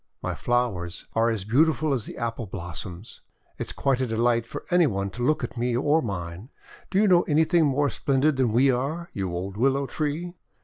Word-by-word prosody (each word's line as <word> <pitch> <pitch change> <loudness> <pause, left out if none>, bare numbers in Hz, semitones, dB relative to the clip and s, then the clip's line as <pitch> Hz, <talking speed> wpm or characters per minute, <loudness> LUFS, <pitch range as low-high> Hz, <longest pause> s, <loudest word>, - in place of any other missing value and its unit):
My - - -1
flowers 105 -8 -1
are 115 +1 +3
as 110 -5 -2
beautiful 155 +5 +2
as 120 -5 -2
the - - -8
Apple 115 -1 -3
blossoms! 90 +2 -8 0.4
It - - -3
is - - -2
quite 135 -2 0
a 130 - 0
delight 115 +1 +1
for - - -7
any 175 -2 +5
one 100 -4 -2
to 120 +5 -5
look 150 +1 +2
at 120 - -5
me 120 0 0
or 150 +5 +3
mine! 95 - -5 0.4
Do 190 - -1
you 215 - +4
know 180 -2 +6
anything 160 +1 +3
more 140 +1 +1
splendid 140 +1 +1
than 130 -4 +2
we 130 +4 +4
are, 150 +8 -3
you 95 -3 -3
old 95 +3 -4
Willow 135 +3 +2
Tree?" 155 +5 -3
125 Hz, 205 wpm, -25 LUFS, 110-145 Hz, 0.4 s, know